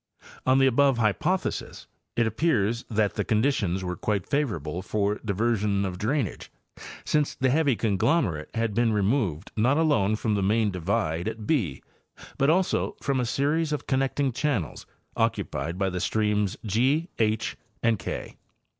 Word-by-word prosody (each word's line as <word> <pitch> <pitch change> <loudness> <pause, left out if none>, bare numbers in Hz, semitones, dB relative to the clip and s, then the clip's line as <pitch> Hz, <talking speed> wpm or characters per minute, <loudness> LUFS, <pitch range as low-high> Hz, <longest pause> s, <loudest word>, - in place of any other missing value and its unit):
On 130 +1 +5
the 135 - +5
above 135 0 +4
hy 110 -3 +3
pothesis 180 - -2 0.3
it 120 - +2
appears 115 -2 +1
that 105 -3 +1
the - - -1
conditions 105 -6 +1
were 90 -1 -3
quite 100 +1 -1
favorable 90 - -2
for 105 +1 -1
diversion 105 -1 0
of 90 -1 -4
drainage, 120 0 -2 0.5
since 150 -2 +1
the 130 -1 +1
heavy 145 -3 +3
conglomerate 100 - +1
had 115 -2 0
been 115 +1 +2
removed 100 - 0
not 125 +6 +3
alone 145 -11 +2
from 110 0 -1
the 100 - +1
main 105 +2 +2
divide 85 -1 -1
at 110 -1 -5
>, 95 - -4
but 140 - +4
also 180 +3 +1
from 140 -2 0
a 125 - 0
series 150 +6 0
of 150 - -2
connecting 135 0 0
channels 125 - -2 0.3
occupied 80 +6 -1
by 95 -1 0
the 90 - -3
streams 105 0 0
G, 130 - +1
H 110 -1 0 0.3
and 115 -3 +2
K. - - -6
110 Hz, 155 wpm, -26 LUFS, 100-135 Hz, 0.5 s, On